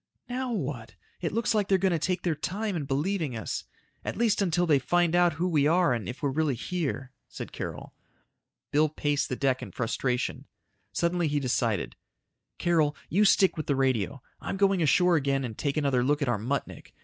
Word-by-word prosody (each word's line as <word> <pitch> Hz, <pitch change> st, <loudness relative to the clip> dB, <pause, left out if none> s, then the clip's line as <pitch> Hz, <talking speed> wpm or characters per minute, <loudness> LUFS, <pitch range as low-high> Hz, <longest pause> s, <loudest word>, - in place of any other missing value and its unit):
"Now 255 Hz, 0 st, -3 dB
what? 135 Hz, -, -4 dB, 0.3 s
It 165 Hz, -, -1 dB
looks 230 Hz, +2 st, +1 dB
like 210 Hz, -2 st, +1 dB
they're 195 Hz, -, +4 dB
going 190 Hz, 0 st, +2 dB
to 165 Hz, -, +1 dB
take 180 Hz, +3 st, -1 dB
their 175 Hz, -, +1 dB
time 190 Hz, +7 st, -3 dB
in 155 Hz, -4 st, -2 dB
believing 150 Hz, -, -1 dB
us. 110 Hz, -, -4 dB, 0.4 s
At -, -, -4 dB
least 225 Hz, -3 st, +2 dB
until 175 Hz, -2 st, +2 dB
they 150 Hz, -5 st, +4 dB
find 175 Hz, +5 st, +2 dB
out 175 Hz, -1 st, +4 dB
who 170 Hz, +4 st, -1 dB
we 150 Hz, -5 st, +3 dB
are 170 Hz, -2 st, +3 dB
and 115 Hz, -2 st, -3 dB
if 125 Hz, -, -8 dB
we're 140 Hz, -, +1 dB
really 150 Hz, -1 st, +1 dB
here," 135 Hz, -2 st, -3 dB, 0.2 s
said -, -, -8 dB
Carol. -, -, -6 dB, 0.8 s
Bill 155 Hz, +1 st, +3 dB
paced 145 Hz, -1 st, -1 dB
the 125 Hz, -, -1 dB
deck 130 Hz, -1 st, +1 dB
in -, -, -7 dB
frustration. 125 Hz, +1 st, -2 dB, 0.4 s
Suddenly 170 Hz, 0 st, +1 dB
he 145 Hz, 0 st, +1 dB
decided, 120 Hz, -6 st, 0 dB, 0.6 s
"Carol, 160 Hz, -4 st, +2 dB
you 200 Hz, +5 st, +3 dB
stick 195 Hz, -1 st, +5 dB
with 155 Hz, -, -4 dB
the 140 Hz, -, +2 dB
radio. 130 Hz, 0 st, 0 dB, 0.2 s
I'm -, -, -4 dB
going 195 Hz, -2 st, +3 dB
ashore 175 Hz, +3 st, +4 dB
again 135 Hz, -2 st, 0 dB
and 115 Hz, -3 st, -6 dB
take 140 Hz, +4 st, -2 dB
another 140 Hz, -4 st, +2 dB
look 145 Hz, +3 st, +1 dB
at -, -, -1 dB
our 115 Hz, -4 st, +1 dB
Muttnik. 130 Hz, +5 st, -4 dB
155 Hz, 195 wpm, -28 LUFS, 135-180 Hz, 0.8 s, stick